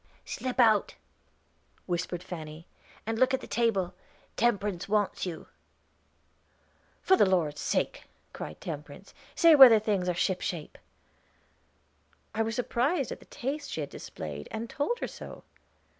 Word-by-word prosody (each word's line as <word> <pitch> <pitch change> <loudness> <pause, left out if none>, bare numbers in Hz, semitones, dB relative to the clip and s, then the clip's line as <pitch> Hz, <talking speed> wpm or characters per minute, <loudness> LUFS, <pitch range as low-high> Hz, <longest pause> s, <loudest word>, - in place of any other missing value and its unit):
"Slip 255 0 -4
out," 220 -4 +4 0.9
whispered 175 0 -3
Fanny, 160 -2 -8 0.4
"and 225 +1 -2
look 260 +1 +4
at - - -5
the - - -8
table; 210 -7 0 0.4
Temperance 205 -5 0
wants 205 -2 0
you." 165 -3 -6 1.6
"For 380 - +5
the 205 - +4
Lord's 160 -6 +1
sake!" - - -1 0.3
cried - - -7
Temperance, - - -8 0.2
"say 335 -2 +7
whether 265 -6 +10
things 205 -4 0
are 175 - 0
ship 185 +1 0
shape." 165 -4 -5 1.5
I 225 - 0
was 225 0 -1
surprised 250 +7 0
at - - -6
the - - -17
taste 285 +4 -4
she 160 - -3
had 145 - -5
displayed, 75 -2 -7
and 225 +1 -5
told 385 +12 -1
her - - -1
so. - - -10
210 Hz, 140 wpm, -29 LUFS, 175-245 Hz, 1.6 s, whether